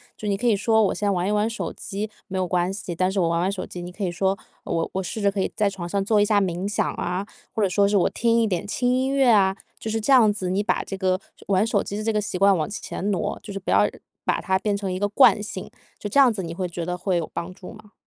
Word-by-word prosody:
就 210 - -6
你 200 -1 +1
可 245 - -4
以 230 -4 +4
说 220 +2 +3
我 195 - +2
先 205 -1 0
玩 180 0 0
一 - - +1
玩 210 +2 +2
手 230 - -4
机， 210 +2 -5 0.2
没 190 - -4
有 185 - 0
关 180 +1 +1
系， 195 -3 -5
但 185 +2 +1
是 195 - -1
我 170 - +3
玩 170 0 +1
玩 185 +2 +1
手 195 -2 -4
机 175 - -8
你 175 - -7
可 200 +3 -6
以 180 - 0
说 190 +3 0 0.3
我 165 - -1
我 190 - -1
试 190 +4 -5
着 200 -1 +2
可 195 - -2
以 - - -1
在 210 -2 +2
床 185 -3 -4
上 195 0 -1
做 210 -1 +3
一 - - +4
下 205 -1 +3
冥 185 0 -1
想 205 - 0
啊， 185 +3 -3 0.3
或 215 - +1
者 - - +4
说 200 +2 +3
是 205 0 +2
我 180 - +3
听 230 0 +2
一 225 - +3
点 195 -1 -2
轻 245 +4 +1
音 260 +1 +1
乐 275 -2 +3
啊， 195 -2 +4 0.2
就 220 - -5
是 225 - 0
这 270 +6 +2
样 225 -5 +7
子， 185 -3 -3
你 195 - +1
把 210 - 0
这 195 - -6
个 185 -1 +1 0.3
玩 195 +2 +3
手 215 -3 +1
机 205 - -5
的 215 - -3
这 225 0 0
个 210 - +1
习 195 - -4
惯 195 +1 +5
往 155 0 -1
前 205 -1 -4
挪， 190 -4 -1
就 205 - -9
是 195 - -5
不 - - -4
要 - - +4 0.4
把 - - +1
它 190 -1 0
变 205 0 0
成 195 -2 -3
一 185 - -3
个 205 - +1
惯 215 -1 +5
性， 200 -3 -7 0.3
就 205 - -5
这 250 +7 +2
样 260 -3 +7
子， 200 -4 -4
你 165 -1 -5
会 180 +1 -2
觉 170 -1 -5
得 180 +1 -2
会 180 0 0
有 165 - -2
帮 170 +2 -4
助 185 +2 -11
吗？ 215 -1 -15
200 Hz, 330 characters per minute, -24 LUFS, 185-210 Hz, 0.4 s, 样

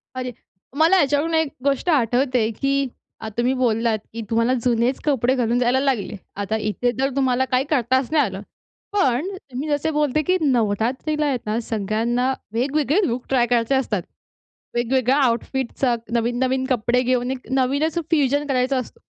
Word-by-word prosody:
अरे, 250 -1 -3 0.5
मला 330 +4 +5
याच्यावरून 290 +3 +1
एक 320 -1 +2 0.2
गोष्ट 280 +5 +1
आठवते 250 -4 +2
की 275 0 +1 0.3
अ, 220 - -5
तुम्ही 245 +2 +2
बोललात 230 -3 +1 0.2
की 230 - -5
तुम्हाला 230 +2 +2
जुनेच 245 +1 +1
कपडे 260 -3 +2
घालून 240 -1 +1
जायला 250 +2 +2
लागले. 260 -7 -1 0.2
आता 205 +2 -2
इथे 220 +3 -1
तर 270 +1 +2
तुम्हाला 260 -1 +2
काही 255 +1 +3
करताच 260 -1 +1
नाही 300 -3 +4
आलं. 195 -2 -5 0.5
पण 280 -4 +2 0.3
मी 285 +4 -3
जसे 290 +2 0
बोलते 300 0 +1
की 370 +3 +2
नवरात्रीला 255 +4 0
आहेत 270 -4 0
ना 215 +2 -1
सगळ्यांना 230 +4 -1 0.2
वेगवेगळे 285 - +1
लूक 240 +1 -3
ट्राय 250 -3 +3
करायचे 240 +2 +2
असतात. 225 -8 0 0.7
वेगवेगळ्या 255 +2 +2
आउटफिटचा 245 +1 0 0.2
नवीन-नवीन 255 +3 0
कपडे 245 0 +2
घेऊन 250 0 0
एक 260 -1 -6
नवीनच 280 +5 +1
फ्युजन 290 -2 +2
करायचा 260 0 +1
असतो. 255 - -6
255 Hz, 155 wpm, -22 LUFS, 235-275 Hz, 0.7 s, मला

